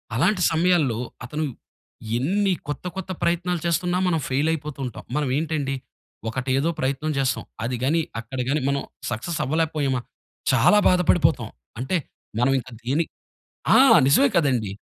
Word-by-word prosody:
అలాంటి 180 - +2
సమయాల్లో 160 -8 +2 0.3
అతను 150 +5 -3 0.7
ఎన్ని 190 +8 +1
కొత్త 145 +4 -5
కొత్త 190 -1 -5
ప్రయత్నాలు 175 0 0
చేస్తున్నా 175 +1 +1
మనం 165 -3 +2
ఫెయిలయిపోతూ 150 +1 -1
ఉంటాం. 125 - -7
మనం 150 -2 0
ఏంటండి 150 -4 -1 0.5
ఒకటేదో 130 +5 0
ప్రయత్నం 140 +4 -1
చేస్తాం. 130 -2 0 0.2
అది 125 +2 -1
గానీ 160 +5 +2 0.2
అక్కడ 120 +3 -7
గానీ 150 +1 +1
మనం 140 -1 0 0.3
సక్సెస్ 135 +9 -3
అవ్వలేకపోయామ 150 -3 0 0.5
చాలా 210 - +5
బాధపడిపోతాం. 180 -1 +3 0.3
అంటే 130 +9 0 0.4
మనం 135 +2 +3
ఇంక 125 - -10
దీని 140 +7 +1 0.7
ఆ! - - +8 0.3
నిజమే 270 - +5
కదండీ! 125 - +2
150 Hz, 130 wpm, -24 LUFS, 130-170 Hz, 0.7 s, ఆ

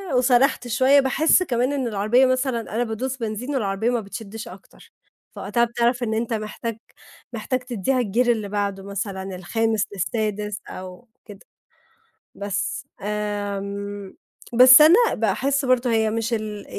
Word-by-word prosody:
وسَرَحت 250 +1 +3
شوية، 260 +4 +4
باحس 310 +7 +3
كمان 255 -2 0
إن 265 -3 -1
العربية 215 +4 +2
مثلًا 255 -2 0
أنا 240 - +1
بادوس 245 +3 -4
بنزين 225 +3 -5
والعربية 215 -1 -1
ما 245 -1 0
بتشدِّش 220 +2 -8
أكتر، - - -15 0.4
فوقتها 210 +5 0
بتعرف 240 +1 0
إن 220 -1 -1
أنت 230 +1 -2
محتاج، 220 +1 -4 0.6
محتاج 245 +3 -2
تديها 250 +1 -1
الgear 240 +3 0
اللي 215 -4 0
بعده 200 -1 -2
مثلًا 195 -1 -5
الخامس 220 +4 -1
للسادس 210 +1 -3
أو 185 +5 -10 0.2
كده، 205 -3 -12 1.0
بس. 200 -1 -4
آمم، 205 -1 -4 0.4
بس 255 +4 +9
أنا 320 +4 +8 0.2
باحس 265 +6 0
برضه 255 -1 +2
هي 220 -1 +2
مش 230 +1 -2
ال 215 -2 -4
225 Hz, 135 wpm, -22 LUFS, 205-250 Hz, 1.0 s, بس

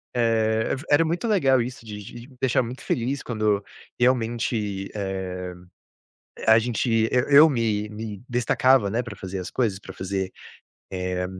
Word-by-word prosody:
eh, 110 -2 +2
é - - +1
v 140 - -9
era 155 +3 +5
muito 170 +7 -2
legal 135 - +3
isso 120 -1 -6
de 105 -1 -7
de 120 +4 -10
me 130 - -18
deixar 130 -1 +3
muito 125 +3 -7
feliz 130 +4 -1
quando, 105 -3 0 0.4
realmente, 115 -5 0
eh, 95 -2 -4 0.9
a 110 0 +7
gente 115 -1 +1
eu 125 +2 +2
eu 150 +3 +8
me 110 -4 0
me 105 -1 -7
destacava, 125 -1 +3
né, 120 +3 0
pra 110 -4 -8
fazer 95 0 -6
as 90 - -6
coisas 110 -6 0
pra 95 - -10
fazer, 95 0 -3 0.6
eh, 90 0 -2
115 Hz, 165 wpm, -24 LUFS, 100-125 Hz, 0.9 s, eu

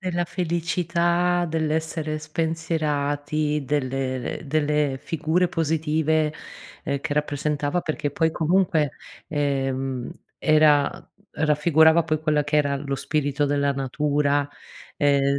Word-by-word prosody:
della 175 -2 -1
felicità, 175 0 0
dell'essere 160 0 -1
spensierati, 150 -2 -1
delle 130 -2 -2
ehm, - - -10
delle 150 -2 +1
figure 165 +4 0
positive, 160 -2 0 0.5
ehm, 140 -2 -2
che 145 - -3
rappresentava 150 +2 -1
perché, 155 -2 -2
poi 160 +2 +1
comunque, 165 -3 +2 0.4
ehm, 135 -3 -1 0.3
era 150 -2 +4 0.4
,raffigurava, 160 +2 +4
poi, 155 -1 -1
quella 150 -2 +1
che 145 +1 0
era 140 -1 +2
lo 140 0 -3
spirito 145 0 -1
della 140 0 +1
natura. 145 +1 0 0.5
Ehm, 140 -1 +2
150 Hz, 105 wpm, -24 LUFS, 145-160 Hz, 0.5 s, era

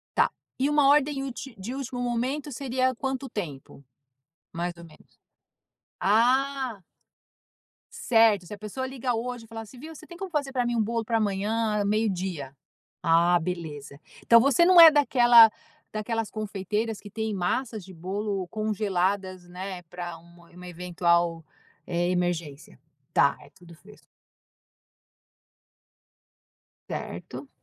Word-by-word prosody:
Tá. - - +3 0.3
E 270 +2 +2
uma 295 -2 +4
ordem 285 -1 +3
ulti 270 -1 -7
de 230 +7 -6
último 260 -2 -5
momento, 255 +4 -2
seria 260 0 0
quanto 265 +1 -4
tempo? 145 - -7 0.7
Mais 175 +1 -3
ou 170 - -12
menos. 155 -2 -19 0.8
Ah! 250 +1 +2 1.1
Certo, 225 -6 +3
se 210 - -7
a - - -12
pessoa 215 +5 -5
liga 260 -2 -2
hoje 240 0 -4
e - - -18
fala 225 0 -7
assim: 225 +4 -14 0.2
"Você 310 - -13
tem 345 - -11
como 385 0 -6
fazer 285 -4 -2
pra 250 -2 0
mim, 240 0 -1
um 220 - +2
bolo 230 +1 -2
pra 230 0 0
amanhã, 210 +1 0
meio-dia?". 190 -9 -1 0.5
Ah, 170 +1 +4
beleza. 155 -5 -6 0.3
Então, 230 0 +8
você 280 +5 +4
não 360 -2 +8
é 325 - +12
daquela 240 -6 +6 0.4
daquelas 225 +1 -3
confeiteiras 215 +1 -3
que 205 - -11
têm 220 -1 -3
massas 210 +3 -2
de 190 0 -12
bolo 190 +2 -3
congeladas, 195 -3 -2
né, 185 0 -6
para 175 0 -7
um 170 +1 -19
uma 180 +1 -11
eventual, 170 -1 0 0.4
eh, 175 0 -1
emergência? 170 - -3 0.3
Tá, - - +4
é - - -16
tudo 170 -2 -16
fresco. 210 +6 -18 2.8
Certo. 280 - -7
215 Hz, 135 wpm, -26 LUFS, 180-245 Hz, 2.8 s, é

